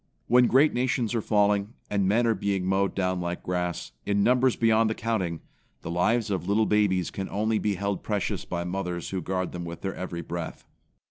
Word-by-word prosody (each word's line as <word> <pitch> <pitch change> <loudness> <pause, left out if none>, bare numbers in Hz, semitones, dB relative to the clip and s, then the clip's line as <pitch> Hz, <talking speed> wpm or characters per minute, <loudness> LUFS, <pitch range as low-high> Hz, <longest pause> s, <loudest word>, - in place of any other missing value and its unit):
When 125 +1 +5
great 145 +4 +4
nations 125 -2 0
are 115 - 0
falling, 105 0 +2
and 100 -2 +1
men 115 +5 +3
are 115 - +3
being 100 -2 -1
mowed 95 +1 +1
down 95 -1 0
like 85 0 -4
grass, 90 -1 -2
in 100 0 +1
numbers 125 +1 +3
beyond 115 -1 +3
the 110 - -1
counting, 95 -8 -2 0.4
the 85 - -4
lives 105 +6 +1
of 95 -2 -2
little 105 +2 +3
babies 100 -5 +2
can 95 -1 -5
only 110 +2 0
be 105 -2 0
held 100 +1 -2
precious 105 -3 -2
by 85 -1 -3
mothers 90 -1 -3
who 95 -1 -2
guard 95 +1 -2
them 90 -1 -5
with 85 0 -7
their 95 - -3
every 90 -2 -5
breath. 85 +1 -6
100 Hz, 200 wpm, -27 LUFS, 90-110 Hz, 0.4 s, When